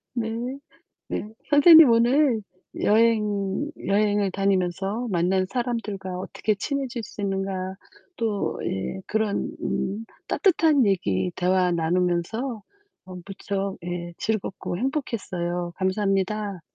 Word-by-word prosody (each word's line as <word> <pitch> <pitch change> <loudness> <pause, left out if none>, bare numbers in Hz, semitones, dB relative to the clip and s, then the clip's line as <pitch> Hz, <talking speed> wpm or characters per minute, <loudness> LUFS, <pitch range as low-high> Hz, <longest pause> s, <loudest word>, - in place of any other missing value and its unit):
네. 225 -2 -2 0.7
네. - - -3 0.2
선생님, 315 +1 +9
오늘 240 +1 +3 0.4
여행 210 +2 +2 0.2
여행을 205 0 +2
다니면서 195 +4 0
만난 185 +1 +1
사람들과 210 -6 -3
어떻게 210 +3 -1
친해질 260 +1 -3
수 215 - -9
있는가? 195 -1 -2 0.4
또 220 -4 -1
예 95 - -3
그런 215 -1 -1
음 205 +4 -2 0.2
따뜻한 320 - +3
얘기, 95 - +1
대화 180 0 +2
나누면서 180 +8 0 0.4
어 185 - -9
무척 195 0 -3
예 175 0 -4
즐겁고 205 -4 -2
행복했어요. 180 - -2
감사합니다. 195 +1 0
200 Hz, 235 characters per minute, -25 LUFS, 185-230 Hz, 0.7 s, 선생님